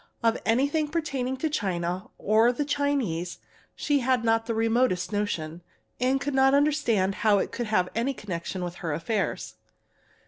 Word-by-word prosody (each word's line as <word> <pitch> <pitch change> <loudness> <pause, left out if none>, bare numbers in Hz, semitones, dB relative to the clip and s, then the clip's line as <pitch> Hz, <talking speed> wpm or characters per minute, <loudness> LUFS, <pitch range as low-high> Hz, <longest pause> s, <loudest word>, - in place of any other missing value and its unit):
Of 230 0 +2
anything 285 +7 +2
pertaining 275 -5 -2
to 315 - -1
China 185 - -2
or 220 +3 +4
the 285 +4 -2
Chinese 270 - -1 0.4
she 290 -1 +1
had 255 -2 +1
not 225 0 +2
the 230 - -1
remotest 225 -4 +1
notion, 175 -6 -2 0.4
and 260 +2 +2
could 285 +1 -3
not 270 +1 +5
understand 280 -10 +2
how 210 -1 +4
it - - -1
could 240 - -3
have 185 -4 +2
any 250 +4 -1
connection 185 -2 -5
with 175 0 -5
her 165 -3 -3
affairs. 190 +7 -2
225 Hz, 160 wpm, -26 LUFS, 190-270 Hz, 0.4 s, not